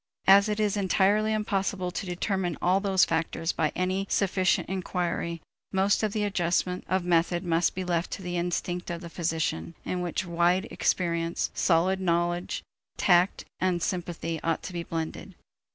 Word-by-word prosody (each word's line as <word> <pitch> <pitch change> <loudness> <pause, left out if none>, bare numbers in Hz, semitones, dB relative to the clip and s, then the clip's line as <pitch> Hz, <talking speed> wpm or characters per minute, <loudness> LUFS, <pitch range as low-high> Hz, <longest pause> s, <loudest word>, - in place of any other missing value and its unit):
As 200 +2 +7
it 210 0 -1
is 210 -1 +1
entirely 205 +2 +2
impossible 195 -3 -1
to 180 +2 -4
determine 180 -1 -1
all 185 +2 +3
those 195 -2 +3
factors 165 0 -1
by 155 -2 0
any 185 +2 -1
sufficient 185 -2 +1
inquiry, 175 -3 -2 0.3
most 195 +1 +2
of 215 -2 0
the 210 0 -1
adjustment 180 -2 0
of 185 -1 +1
method 175 +1 +2
must 170 -1 +1
be 185 - -2
left 175 -1 -1
to 190 - -6
the 175 0 -3
instinct 175 +1 -2
of 170 0 -4
the 170 -2 -9
physician, 160 - -2
in 180 - -2
which 175 +1 -2
wide 175 +2 +2
experience, 170 -1 0
solid 185 +2 +2
knowledge, 175 0 0 0.3
tact, 180 +1 +3
and 180 -2 +1
sympathy 170 -3 -3
ought 165 -1 -1
to 185 - -6
be 170 - -3
blended. 165 -1 -5
180 Hz, 160 wpm, -27 LUFS, 170-190 Hz, 0.3 s, As